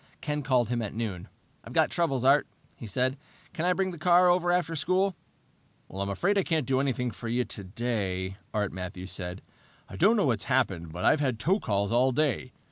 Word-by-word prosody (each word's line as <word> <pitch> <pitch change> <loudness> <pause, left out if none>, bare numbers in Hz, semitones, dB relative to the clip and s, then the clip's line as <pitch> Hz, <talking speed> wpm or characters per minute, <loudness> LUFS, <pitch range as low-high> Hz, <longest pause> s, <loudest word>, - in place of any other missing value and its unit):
Ken 150 -1 -2
called 130 -5 +2
him 120 -1 0
at 105 -2 -5
noon. 105 -6 -4 0.4
"I've - - -10
got - - +3
troubles, 140 -7 0
Art," 140 +2 +4 0.3
he 115 - -9
said. 130 +6 0 0.4
"Can 170 -1 -2
I 180 - +4
bring 190 0 -1
the 170 - -9
car 180 +2 +5
over 175 0 +3
after 175 -2 0
school?" 185 +5 +1 0.8
"I'm 100 +1 -3
afraid 195 - +1
I - - +2
can't 160 -5 0
do 130 +1 +1
a 140 0 +1
thing 125 0 -2
for 115 +3 -8
you 120 +2 0
today," 95 -2 -3
Art 105 -2 -1
Matthews 90 0 -6
said. 90 0 -6 0.4
"I - - -9
don't 215 +6 +4
know 205 - +3
what's 120 -5 0
happened, 100 - 0
but 90 +3 -4
I've 155 - +5
had 130 -5 0
tow 185 - +1
calls 100 - -1
all 125 +3 +3
day. 140 -3 0
125 Hz, 210 wpm, -28 LUFS, 100-165 Hz, 0.8 s, car